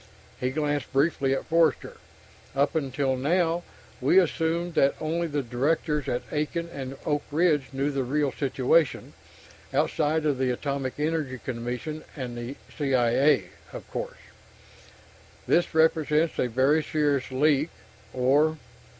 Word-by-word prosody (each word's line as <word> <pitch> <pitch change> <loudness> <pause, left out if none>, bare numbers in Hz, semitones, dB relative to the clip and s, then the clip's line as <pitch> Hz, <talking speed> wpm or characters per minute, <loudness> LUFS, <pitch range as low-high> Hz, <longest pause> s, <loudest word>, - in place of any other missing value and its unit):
He 125 - 0
glanced 145 0 -2
briefly 140 -1 +2
at - - -4
Forster. 165 0 +1 0.6
"Up 140 +1 +2
until 135 -3 0
now, 165 +5 +1 0.4
we 140 +8 +4
assumed 170 -1 +1
that 140 -3 +3
only 165 +2 -1
the 145 -2 -2
directors 145 +4 0
at 120 - -1
Aiken 160 +3 -2
and 135 0 -6
Oak 145 -1 +1
Ridge 150 -2 +2
knew 135 +2 -1
the 135 -1 -1
real 140 +2 0
situation 135 +3 +1 0.6
outside 155 +1 +1
of 145 -4 +1
the 130 -1 +1
Atomic 135 +1 -2
Energy 150 -4 -1
Commission 125 +6 -5
and 125 -1 -5 0.2
C.I.A., 135 0 +2 0.2
of - - -8
course. - - -5 1.3
This 170 -1 +2
represents 160 0 +2
a - - +2
very 135 +6 +3
serious 145 -3 0
leak 145 +3 +2 0.4
or...." 145 +6 +2
145 Hz, 125 wpm, -26 LUFS, 130-160 Hz, 1.3 s, we